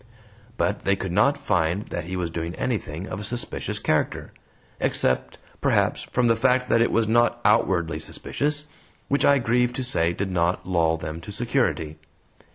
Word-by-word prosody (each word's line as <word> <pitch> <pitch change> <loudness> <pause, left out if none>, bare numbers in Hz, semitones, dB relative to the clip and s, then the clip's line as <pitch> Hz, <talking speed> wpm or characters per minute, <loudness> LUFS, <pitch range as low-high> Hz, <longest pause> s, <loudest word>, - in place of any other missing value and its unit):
But 105 - 0
they 100 - +2
could 95 -2 -4
not 140 +11 +3
find 95 - 0
that 85 - -4
he 90 +2 -5
was 90 -2 -2
doing 85 +1 -4
anything 95 -8 -3
of 95 - -5
a - - -6
suspicious 120 +4 -4
character - - -1 0.5
except, 65 - 0 0.2
perhaps, - - +1
from 125 - +2
the 115 -1 +4
fact 125 +2 +2
that 115 - +4
it 115 - +2
was 115 -1 +2
not 120 +1 +3
OUTWARDLY 85 -7 +2
suspicious, 150 - -2 0.4
which 140 - +2
I 140 - +6
grieve 125 0 +1
to 130 - -3
say 85 -9 +2
did 95 +2 -3
not 90 0 0
lull 85 -3 +2
them 80 +1 -6
to 105 - -8
security. 105 - -1
100 Hz, 170 wpm, -24 LUFS, 85-120 Hz, 0.5 s, I